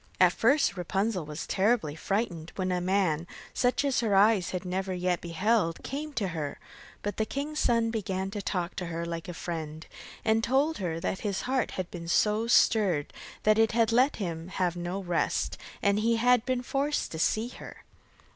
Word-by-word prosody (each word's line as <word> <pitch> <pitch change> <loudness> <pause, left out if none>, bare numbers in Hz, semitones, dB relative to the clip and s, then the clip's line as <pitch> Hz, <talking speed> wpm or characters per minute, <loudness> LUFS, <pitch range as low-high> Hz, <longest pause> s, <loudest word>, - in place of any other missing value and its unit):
At 180 -1 +6
first 275 0 +3
Rapunzel 190 0 -1
was 150 +1 -5
terribly 200 -6 +1
frightened 175 -3 -2
when 185 -1 -1
a 180 0 0
man, 180 -3 +1 0.3
such 250 +3 +1
as 275 -3 +2
her 220 -4 +1
eyes 200 -2 +4
had 180 0 -4
never 185 +1 -2
yet 180 -1 0
beheld, 175 +1 0
came 300 +3 -4
to 205 -7 -1
her; 155 -4 -4 0.5
but 205 -2 -3
the 220 - +2
king's 300 +2 -3
son 230 -1 +2
began 195 -3 -2
to 205 0 -4
talk 180 -2 -2
to 180 - -3
her 170 0 -3
quite 170 - -4
like 165 +2 -5
a 175 - -6
friend, 160 -2 -5 0.4
and 220 0 +3
told 275 +5 +2
her 165 -4 -2
that 190 - -2
his 200 -3 -2
heart 260 +1 0
had 185 -2 -3
been 170 -2 -7
so 210 +6 +2
stirred 200 -10 +3 0.3
that 215 +1 +4
it 225 0 +4
had 230 -1 +3
let 255 +5 +4
him 170 -4 -4
have 185 -2 -1
no 175 +2 -3
rest, 175 -2 0 0.3
and 200 0 +3
he 230 +2 +2
had 245 +1 +3
been 255 -1 0
forced 280 +4 -1
to 160 - -5
see 220 +7 +1
her. - - -11
195 Hz, 195 wpm, -29 LUFS, 175-230 Hz, 0.5 s, At